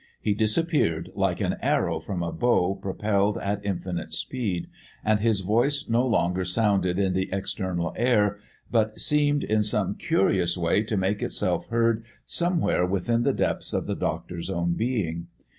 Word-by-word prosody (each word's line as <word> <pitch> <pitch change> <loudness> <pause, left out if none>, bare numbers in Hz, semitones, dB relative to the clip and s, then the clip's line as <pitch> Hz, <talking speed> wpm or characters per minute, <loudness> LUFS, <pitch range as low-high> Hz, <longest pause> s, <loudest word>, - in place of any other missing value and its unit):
He 105 - +1
disappeared 110 - +1
like - - 0
an - - 0
arrow 80 -2 +1
from 85 +2 -4
a 85 - -2
bow 120 -6 +2
propelled 100 +1 0
at 100 +1 -2
infinite 90 -3 -3
speed, 105 -9 -2 0.4
and 110 -1 +3
his 110 -2 +2
voice 120 +9 +1
no 120 +3 +2
longer 90 -5 +1
sounded 95 -1 +1
in 95 -2 +1
the 95 +1 -1
external 95 -2 -2
air, 105 -4 +2 0.3
but 110 -2 +1
seemed 145 -1 +2
in 110 0 +1
some 105 - +1
curious 90 -2 +1
way 85 +3 +2
to 110 -1 -2
make 95 +2 0
itself - - 0
heard 115 -1 +1 0.2
somewhere 175 - +1
within 100 +6 +1
the - - +2
depths - - -1
of - - -1
the - - -2
doctor's 85 -1 -3
own 85 0 0
being. 85 -7 -2
100 Hz, 160 wpm, -26 LUFS, 90-115 Hz, 0.4 s, and